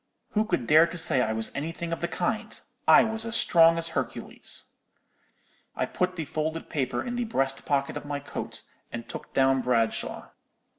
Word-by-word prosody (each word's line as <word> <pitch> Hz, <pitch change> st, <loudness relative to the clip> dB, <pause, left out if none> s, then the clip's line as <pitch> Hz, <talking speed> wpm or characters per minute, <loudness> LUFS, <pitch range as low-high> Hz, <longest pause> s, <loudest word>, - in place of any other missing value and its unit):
Who 215 Hz, 0 st, +1 dB
could 130 Hz, -, -1 dB
dare 155 Hz, +5 st, +6 dB
to 175 Hz, -, -7 dB
say 135 Hz, -6 st, +3 dB
I 110 Hz, -, 0 dB
was 110 Hz, 0 st, 0 dB
any 150 Hz, +3 st, -2 dB
thing 170 Hz, 0 st, -4 dB
of 165 Hz, -, -4 dB
the 170 Hz, -, 0 dB
kind? -, -, -2 dB, 0.3 s
I -, -, +8 dB
was 225 Hz, 0 st, -1 dB
as 230 Hz, 0 st, -2 dB
strong 165 Hz, -5 st, +5 dB
as 165 Hz, 0 st, +3 dB
Hercules. -, -, -3 dB, 1.0 s
"I -, -, 0 dB
put 180 Hz, 0 st, -1 dB
the 165 Hz, -3 st, -4 dB
folded 155 Hz, +2 st, -3 dB
paper 135 Hz, -5 st, -1 dB
in 245 Hz, -1 st, -4 dB
the 245 Hz, -, -1 dB
breast 135 Hz, -11 st, -1 dB
pocket 140 Hz, -1 st, 0 dB
of -, -, -6 dB
my 145 Hz, 0 st, -3 dB
coat, 145 Hz, -, -6 dB, 0.3 s
and 115 Hz, 0 st, -6 dB
took -, -, -8 dB
down 135 Hz, 0 st, +3 dB
Bradshaw. 115 Hz, -3 st, 0 dB
155 Hz, 190 wpm, -27 LUFS, 135-170 Hz, 1.0 s, I